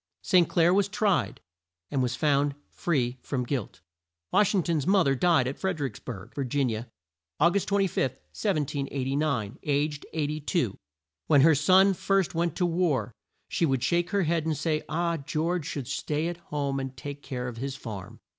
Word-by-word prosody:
St. 180 -3 +4
Clair 170 0 +4
was 200 0 +3
tried, 205 -1 0 0.5
and 135 - +1
was 125 -1 0
found 145 0 +2 0.2
free 130 -7 -1
from 130 -3 -2
guilt. 120 - -4 0.5
Wash 210 0 +3
ing 185 - +2
ton's 160 -3 0
mo 195 -1 +5
ther 135 - +2
died 155 -2 +3
at 135 - -4
Fred 190 -4 -1
er 145 - 0
icks 120 -6 -6
burg, 100 -7 -8
Vir 140 - -2
gin 130 -1 0
i - - -1
a, 110 +2 -4 0.5
Au 170 +4 +5
gust 200 +1 0
25, 195 -9 +1
1789, 140 - -2
aged 145 0 -1
82. 150 - -1 0.5
When 145 -3 +6
her 160 +3 +7
son 185 +7 +5
first 195 0 +1
went 170 -1 0
to 180 - +1
war, 160 - 0 0.3
she 165 - +1
would 135 -3 0
shake 175 0 +1
her 200 -1 +1
head 165 0 +1
and 155 -2 0
say, 155 +1 0
"Ah, 170 +1 0
George 155 +3 -2
should 135 -5 -4
stay 150 +2 -1
at 175 0 -4
home 140 -2 -1
and 135 -1 -5
take 145 0 -7
care 125 -3 -4
of 120 -2 -6
his 135 +2 -4
farm." 105 -8 -8
150 Hz, 185 wpm, -27 LUFS, 135-175 Hz, 0.5 s, her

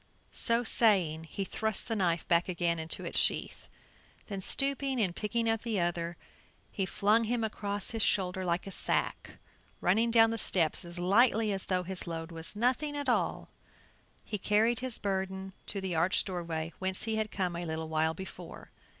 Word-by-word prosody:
So 235 +1 +5
saying, 185 -9 +4
he 195 +5 -4
thrust 220 +2 -2
the 225 - -1
knife 175 -5 0
back 170 +1 +2
again 170 -2 0
into 160 0 -5
its - - +1
sheath, - - 0 0.6
then 195 -2 -4
stooping 275 +3 +1
and 185 -6 0
picking 230 +2 -1
up 225 -1 +1
the 225 -4 -1
other, 170 -1 -2 0.5
he 195 -3 -2
flung 215 +5 +2
him 235 +1 -1
across 205 -2 -2
his 225 -2 -2
shoulder 190 -2 0
like 175 0 -1
a 195 - -7
sack, - - +1
and - - -17 0.4
running 220 +6 +2
down 225 -1 +5
the 230 - -3
steps 165 -6 +1
as 175 0 -10
lightly 215 +4 +3
as 195 -1 -1
though 185 -1 0
his 185 0 -3
load 165 0 -5
was 165 +4 -4
nothing 260 +6 0
at 285 -2 -2
all, 240 - 0 0.7
he 210 - -4
carried 220 +4 +2
his 255 -3 -3
burden 190 -1 -3
to 200 - -2
the 190 -2 -3
arched 170 +4 +2
doorway 170 -3 -4
whence 190 0 -1
he 220 -1 -1
had 215 0 -1
come 180 -4 -2
a 170 - -4
little 160 -1 -4
while 160 +1 0
before. 190 +3 -10
190 Hz, 185 wpm, -30 LUFS, 175-225 Hz, 0.7 s, So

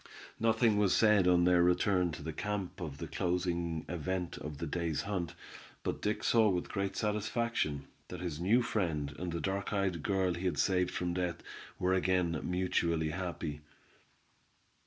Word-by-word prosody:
Nothing 115 -1 +3
was 100 -3 +3
said 105 -4 +5
on 90 -1 +5
their 90 0 +5
return 90 0 +3
to - - -7
the 80 - -4
camp 100 +1 -3
of 75 -5 -5
the - - -5
closing 85 -2 -1
event 90 +1 -3
of 75 -1 -6
the 85 - -3
day's 85 -1 -1
hunt, 95 -4 -3 0.5
but - - -2
Dick 105 - -1
saw 110 -2 +4
with 90 -2 -1
great 100 -1 -2
satisfaction, 105 - -1 0.2
that 90 - -7
his 85 -4 -4
new 110 +8 +3
friend 80 -10 -1
and 90 0 -3
the 85 - -2
dark 95 +2 -2
eyed 95 -5 0
girl 95 0 +1
he 85 +2 -5
had 85 -5 0
saved 90 +2 +2
from 90 -1 -2
death, 90 -1 -2 0.3
were 90 +1 +1
again 90 -3 +1
mutually 85 -3 0
happy. 85 -4 -4
90 Hz, 165 wpm, -33 LUFS, 85-100 Hz, 0.5 s, said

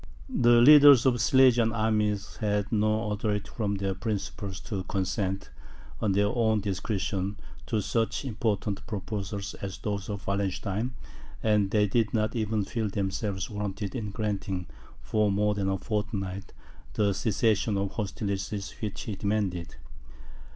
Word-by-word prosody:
The 120 0 +6
leaders 145 -1 +9
of 130 - +5
the 120 - -3
Silesian 125 -4 +5
armies 105 -2 0
had 105 -2 -1
no 110 0 +1
authority 105 -1 -1
from 105 -3 -1
their 95 -1 -1
principals 100 -1 -4
to 100 -4 -4
consent, 95 +1 -2 0.5
on 105 -3 +2
their 100 +1 +3
own 110 0 +2
discretion, 100 0 -2 0.3
to 110 -2 0
such 115 +6 -1
important 105 -4 -2
proposals 100 -1 -4
as 95 -1 -5
those 100 -1 -4
of 100 -1 -5
Wallenstein, 100 +4 -2 0.5
and 105 -3 +3
they 105 +1 +3
did 110 +2 +1
not 110 +2 0
even 110 -2 0
feel 110 -1 -2
themselves 95 -1 -2
warranted 105 -1 -4
in 110 -5 -3
granting, 100 -3 -3 0.4
for 105 -2 +1
more 105 +1 +2
than 100 -1 -1
a 95 - 0
fortnight, 100 -1 -3 0.4
the 100 -2 +2
cessation 105 0 +1
of 100 0 -1
hostilities 100 -1 -3
which 105 -1 -4
he 105 - -4
demanded. 100 -4 -2
105 Hz, 140 wpm, -28 LUFS, 100-110 Hz, 0.5 s, leaders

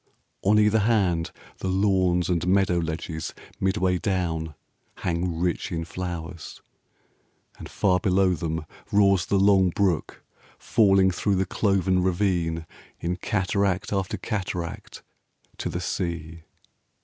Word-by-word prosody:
On 105 +2 +3
either 105 +1 +4
hand 100 -7 +2
5 - - -21
The - - -3
lawns 95 -2 +2
and 90 -1 0
meadow 95 -2 +3
ledges 80 0 -4 0.2
midway 95 -2 +1
down 80 -5 -2 0.5
Hang 85 -1 -1
rich 90 +1 -1
in 80 -1 -3
flowers, 85 -2 -6 1.0
and - - -8
far 90 -3 +2
below 95 0 +3
them 80 -1 -3 0.3
roars 100 -3 +4
The 100 - +2
long 95 -1 +5
brook 90 -2 -1 0.3
falling 95 -3 +3
through 100 +3 0
the 95 +1 +1
clov'n 95 -2 +1
ravine 85 -3 0 0.3
In 85 +1 -2
cataract 95 +1 0
after 95 -1 -1
cataract 90 -6 -5 0.6
to - - -2
the 90 - -3
sea. 85 -3 -4
90 Hz, 125 wpm, -25 LUFS, 85-95 Hz, 1.0 s, long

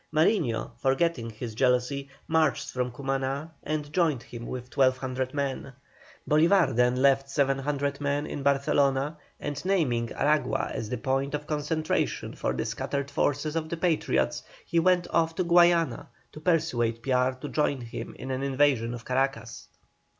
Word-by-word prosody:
Mariño, 155 - +1
forgetting 135 -2 +1
his 110 +1 -7
jealousy, 125 +3 +1 0.2
marched 160 -3 +1
from 125 -1 -2
Cumaná 135 +3 -3
and 150 -1 -4
joined 155 -9 +1
him 120 -1 -8
with 125 0 -7
1,200 130 -1 +1
men. 140 -1 -3 0.5
Bolívar 165 - +4
then 125 +1 +3
left 135 +1 +3
700 140 +1 0
men 145 +1 0
in 145 - -5
Barcelona, 140 +1 +1 0.2
and 145 -1 -4
naming 130 -12 +1
Aragua 150 +1 +1
as 110 - -4
the 125 - -2
point 135 +1 -1
of 150 0 -5
concentration 155 +1 -1
for - - -2
the - - -2
scattered 140 0 -3
forces 145 +2 0
of 160 -1 -2
the 170 - -3
Patriots, 165 -2 +1 0.2
he 170 - +1
went 180 +1 +3
off 165 -1 +1
to 185 - 0
Guayana 170 -1 +4 0.2
to - - -10
persuade 150 -9 0
Piar 130 -1 +2
to 145 - -5
join 145 -3 0
him 115 -1 -7
in 130 +2 -6
an 130 0 -2
invasion 135 -4 +2
of 120 - -10
Caracas. 135 +1 -2
140 Hz, 150 wpm, -27 LUFS, 130-155 Hz, 0.5 s, Bolívar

